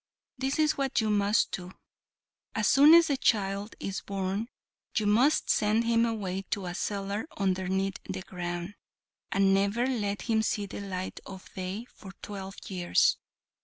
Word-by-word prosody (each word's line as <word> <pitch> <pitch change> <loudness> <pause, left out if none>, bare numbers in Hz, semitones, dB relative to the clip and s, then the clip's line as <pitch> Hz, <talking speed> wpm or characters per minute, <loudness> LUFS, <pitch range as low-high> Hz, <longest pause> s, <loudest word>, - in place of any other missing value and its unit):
This 270 +1 -1
is 310 -1 +2
what 270 -2 +1
you 220 -1 +1
must 205 +1 +2
do; 180 0 -6 0.8
as 215 -2 +1
soon 295 +4 +8
as 340 0 +7
the 280 -3 0
child 200 -3 0
is 195 -1 -4
born 195 +2 -3 0.5
you 215 - +1
must 240 +9 +3
send 215 +2 +2
him 230 0 +3
away 195 -4 -2
to 200 -2 -2
a 175 - -4
cellar 200 - -3
underneath 190 0 0
the 185 - -4
ground, 175 +1 -5 0.6
and 195 0 +3
never 200 +5 +2
let 210 -6 -1
him 220 -2 +2
see 210 -1 -1
the 200 - -7
light 185 -2 -5
of 190 -1 -11
day 190 +4 -4
for 195 -5 -13
twelve 195 -1 -7
years. 190 - +2
200 Hz, 160 wpm, -29 LUFS, 190-230 Hz, 0.8 s, soon